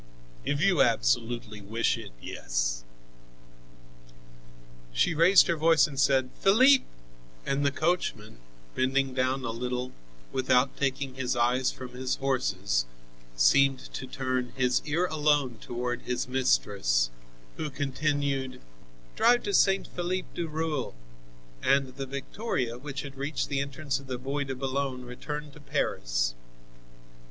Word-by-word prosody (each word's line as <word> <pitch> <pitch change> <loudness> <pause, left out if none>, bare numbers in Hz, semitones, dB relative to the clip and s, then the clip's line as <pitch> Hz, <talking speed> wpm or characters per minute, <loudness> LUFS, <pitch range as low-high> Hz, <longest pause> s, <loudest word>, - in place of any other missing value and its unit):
"If 145 - -1
you 195 -2 +4
absolutely 105 - +1
wish 110 +4 0
it, - - -8
yes." - - -2 2.1
She - - +2
raised 170 +5 +6
her 170 - +1
voice 160 0 +5
and 140 -3 -5
said: 135 -2 +3
"Philippe!" 260 +7 +6 0.6
And 140 +1 0
the 140 - +4
coachman, 140 - -1 0.3
bending 135 +1 +1
down 130 +1 0
a 115 - -1
little, 125 +2 -3 0.4
without 130 0 +2
taking 135 -1 -1
his 130 -1 -2
eyes 125 +2 +2
from 130 -1 -8
his 125 +1 -2
horses, 100 - 0 0.5
seemed 135 - +5 0.2
to 130 - -5
turn 130 -2 -2
his 125 -1 +2
ear 160 +4 +1
alone 150 -7 +1
toward 120 0 -3
his 125 0 -2
mistress, 100 - +1 0.5
who 155 - -3
continued: 140 -1 -1 0.6
"Drive 240 0 +4
to 205 - -2
St. 195 +1 +4
Philippe 180 +1 -3
du 170 - -3
Roule." 155 - -2 0.7
And 135 -1 +3
the 135 0 -5
victoria, 135 - -3
which 140 0 -5
had 140 -1 -8
reached 140 +1 -2
the 140 -2 0
entrance 140 0 -2
of 140 - -13
the 130 -1 -3
Bois 140 +3 -3
de 135 -1 -4
Boulogne 130 -1 -2
returned 150 +4 -6
to 150 - -13
Paris. - - -1
135 Hz, 130 wpm, -28 LUFS, 125-145 Hz, 2.1 s, raised